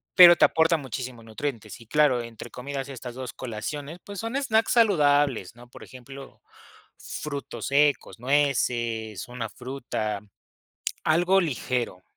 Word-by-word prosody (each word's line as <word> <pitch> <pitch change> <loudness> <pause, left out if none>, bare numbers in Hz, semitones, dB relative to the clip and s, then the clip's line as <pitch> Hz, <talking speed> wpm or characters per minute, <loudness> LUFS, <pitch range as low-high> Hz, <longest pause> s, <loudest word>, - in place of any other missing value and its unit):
pero 175 -2 +10
te - - +6
aporta 165 +1 +3
muchísimos 130 -4 -6
nutrientes. 115 -1 -5
Y - - -13
claro, 145 -2 +3
entre 115 -1 -9
comidas, 135 +1 -5
estas 125 -2 -7
2 130 -2 -6
colaciones, 140 +7 -6
pues, 200 -1 -8
son 230 +3 -4
snacks 225 -4 +2
saludables, 145 - +3
¿no?, 120 0 -15
por - - -13
ejemplo, 135 +2 -12 0.6
frutos 140 -6 -6
secos, 140 -3 +2
nueces, 120 -6 0
una 120 -2 -5
fruta, 120 -5 -4 0.8
algo 175 +4 +4
ligero. 125 - -2
135 Hz, 130 wpm, -26 LUFS, 120-150 Hz, 0.8 s, pero